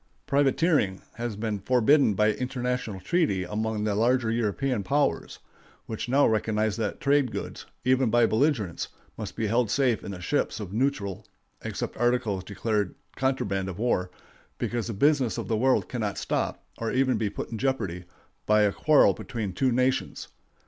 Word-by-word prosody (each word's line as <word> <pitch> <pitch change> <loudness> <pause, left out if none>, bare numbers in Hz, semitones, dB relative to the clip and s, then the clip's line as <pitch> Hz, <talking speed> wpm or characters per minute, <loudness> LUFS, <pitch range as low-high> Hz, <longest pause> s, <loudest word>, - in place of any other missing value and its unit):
Privateering 140 - +2 0.2
has 120 -2 -3
been 105 -1 -2
forbidden 125 +2 +3
by 105 +2 +3
international 125 -4 -3
treaty 140 - +1
among 105 +3 -2
the 105 -1 0
larger 115 +2 +2
European 115 +2 0
powers, 140 +6 0 0.5
which 110 +2 -5
now 140 +3 +4
recognize 110 -1 +1
that 110 -3 -2
trade 140 -3 +2
goods, - - -6 0.2
even 130 -2 +3
of 120 -1 +5
belligerents, 110 - +1 0.3
must - - -6
be 110 - -1
held 115 +1 +1
safe 125 -2 +1
in - - -6
the 95 -2 -6
ships 115 +10 -1
of 100 -3 -6
neutrals 110 -6 -1 0.3
(except - - -4
articles 120 -5 +1
declared 105 0 -2 0.2
contraband 100 -8 -1
of 90 - -7
war), 105 -5 0 0.5
because 120 -1 -2
the 115 - -3
business 130 -1 +2
of - - -4
the 115 - 0
world 130 +4 +2
cannot 110 -5 -3
stop, - - -2
or 115 - -2
even 130 0 +2
be 105 - 0
put - - -6
in 110 - -4
jeopardy, 100 -10 -1 0.4
by 105 0 +5
a 100 -1 +2
quarrel 150 -10 +5
between 105 0 -5
two 130 +7 +1
nations. 130 +2 0
115 Hz, 165 wpm, -27 LUFS, 105-130 Hz, 0.5 s, of